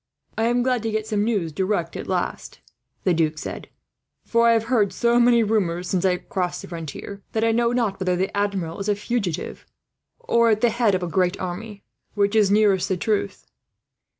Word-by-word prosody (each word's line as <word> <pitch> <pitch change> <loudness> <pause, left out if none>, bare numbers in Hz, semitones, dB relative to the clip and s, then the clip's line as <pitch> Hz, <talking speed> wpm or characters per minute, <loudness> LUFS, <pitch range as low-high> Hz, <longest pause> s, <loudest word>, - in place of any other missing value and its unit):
"I 225 - 0
am 240 +1 +2
glad 250 -2 +1
to 225 - -2
get 215 0 -2
some 210 -2 0
news 205 -8 0
direct, 185 0 -1
at - - -6
last," - - -3 0.4
the 185 - +3
Duc 160 -2 0
said; - - -7 0.6
"for 235 0 +3
I - - +6
have 225 -1 +2
heard 225 -4 +1
so 235 +5 +2
many 235 -1 +5
rumours, 185 -5 0
since 185 -2 0
I 180 -1 +3
crossed 185 -4 -3
the - - -8
frontier, 170 +4 -7
that 225 - 0
I 230 - +3
know 235 +1 +2
not 230 -5 0
whether 185 -1 0
the 190 +3 -2
Admiral 200 -4 -2
is 200 +1 -3
a 205 - +3
fugitive 205 -5 -3 0.5
or 235 - +2
at 215 -1 +2
the 240 - +3
head 230 -3 +2
of 185 - -2
a - - -2
great 180 +2 0
army. 195 +3 -6 0.3
Which 205 +1 +1
is 210 -3 +4
nearest 200 -2 +3
the 190 - 0
truth?" 210 +2 -2
205 Hz, 205 wpm, -23 LUFS, 185-230 Hz, 0.6 s, I